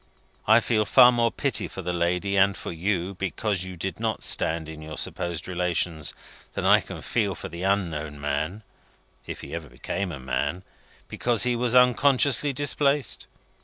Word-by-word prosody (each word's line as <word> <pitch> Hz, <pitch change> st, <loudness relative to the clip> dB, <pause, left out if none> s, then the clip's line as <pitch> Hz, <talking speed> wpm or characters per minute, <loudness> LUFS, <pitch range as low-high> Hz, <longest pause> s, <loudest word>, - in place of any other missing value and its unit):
I 110 Hz, +2 st, +6 dB
feel 110 Hz, -2 st, +1 dB
far 120 Hz, +5 st, +7 dB
more 120 Hz, -1 st, +1 dB
pity 140 Hz, -3 st, -1 dB
for 95 Hz, -, -8 dB
the 90 Hz, +1 st, -2 dB
lady 90 Hz, +3 st, 0 dB
and 100 Hz, 0 st, +3 dB
for -, -, -6 dB
you, 90 Hz, +2 st, -2 dB
because 95 Hz, +1 st, -2 dB
you 95 Hz, -1 st, -8 dB
did 95 Hz, +5 st, -4 dB
not 110 Hz, -1 st, -2 dB
stand 80 Hz, 0 st, +1 dB
in 80 Hz, -1 st, -9 dB
your 75 Hz, 0 st, -8 dB
supposed 85 Hz, -2 st, -3 dB
relations, 90 Hz, -3 st, -1 dB, 0.4 s
than -, -, -3 dB
I -, -, +6 dB
can -, -, -9 dB
feel -, -, 0 dB
for -, -, -8 dB
the 85 Hz, +1 st, -8 dB
unknown 85 Hz, -7 st, -1 dB
man 75 Hz, +8 st, -3 dB, 0.6 s
(if -, -, -6 dB
he -, -, -9 dB
ever 80 Hz, -4 st, -6 dB
became 90 Hz, +9 st, -4 dB
a 70 Hz, -, -7 dB
man), 65 Hz, +8 st, -2 dB, 0.4 s
because 120 Hz, -2 st, +1 dB
he 125 Hz, -1 st, +2 dB
was 120 Hz, 0 st, +1 dB
unconsciously 130 Hz, +3 st, +4 dB
displaced. 140 Hz, 0 st, 0 dB
95 Hz, 170 wpm, -25 LUFS, 85-115 Hz, 0.6 s, far